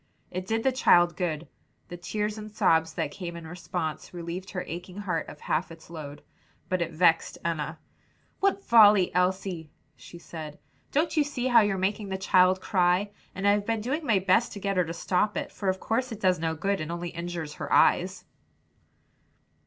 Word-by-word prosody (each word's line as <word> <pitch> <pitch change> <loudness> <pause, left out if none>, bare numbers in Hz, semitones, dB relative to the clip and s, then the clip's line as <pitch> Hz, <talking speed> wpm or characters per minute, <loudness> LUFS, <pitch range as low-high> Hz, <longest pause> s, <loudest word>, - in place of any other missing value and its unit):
It 185 +1 -5
did 225 0 0
the 265 - +3
child 175 -9 +4
good; 165 -3 -2 0.4
the 175 - -6
tears 210 +4 -3
and 215 0 -8
sobs 160 -5 +2
that 145 - -2
came 170 -1 -6
in 170 -1 -8
response, 160 -1 -5
relieved 175 +2 -5
her 180 -2 -4
aching 180 +2 -7
heart 180 -6 -2
of 150 - -12
half 165 +3 -1
its 165 0 -13
load. 150 -3 -8 0.5
But 185 -1 0
it 170 0 -1
vexed 165 0 +2
Enna. 160 -1 -2 0.6
"What 395 0 +1
folly, 210 -5 +6
Elsie!" 180 -3 0 0.3
she 130 +7 -12
said, 155 -3 -8 0.3
"don't 315 +3 +1
you 305 - +4
see 275 -4 -4
how 240 -3 +6
you're 205 -2 +1
making 200 +2 -1
the 190 - -2
child 185 -1 +4
cry? 185 +2 +1 0.2
And 195 +2 -1
I've 205 0 +3
been 225 -1 0
doing 270 +8 -2
my 225 -8 +3
best 190 +5 +2
to 205 - -7
get 200 0 -1
her 180 - +3
to 165 - -5
stop 185 +4 0
it; - - -3
for 195 - -2
of 190 0 -1
course 250 +3 -1
it 220 - -6
does 185 -4 +2
no 160 0 -1
good, 195 +3 -1
and 155 +1 -4
only 175 0 -4
injures 170 -3 -5
her - - -4
eyes." - - +3
185 Hz, 190 wpm, -27 LUFS, 170-205 Hz, 0.6 s, folly